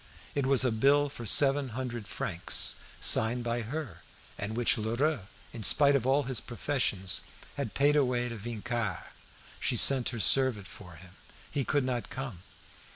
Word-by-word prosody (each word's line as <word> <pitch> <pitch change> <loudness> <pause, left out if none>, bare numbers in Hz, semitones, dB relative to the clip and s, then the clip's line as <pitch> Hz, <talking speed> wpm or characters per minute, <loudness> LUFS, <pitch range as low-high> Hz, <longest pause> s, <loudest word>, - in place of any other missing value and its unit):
It 140 -2 -1
was 135 -1 +4
a 125 - +1
bill 140 +6 +2
for 120 -4 -8
seven 140 +3 +4
hundred 120 -4 -5
francs, 90 -2 +1 0.2
signed 120 +2 +3
by 120 0 -2
her, 120 - -7 0.3
and 105 +3 -6
which 120 0 +4
Lheureux, 120 +1 -2 0.3
in 115 - -8
spite 140 +6 +6
of 130 -2 -1
all 140 +2 +2
his 130 -3 -1
professions, 115 -5 -1 0.3
had 140 -7 -5
paid 145 +1 +2
away 125 -4 0
to 115 - -7
Vincart. 115 -1 -5 0.6
She - - -1
sent 135 -3 +4
her 120 - -6
servant 120 -3 +2
for 90 -3 -13
him. 85 +2 -14 0.4
He 145 -2 -2
could 145 +1 0
not 125 -2 -4
come. 120 -10 -7
120 Hz, 160 wpm, -29 LUFS, 110-135 Hz, 0.6 s, spite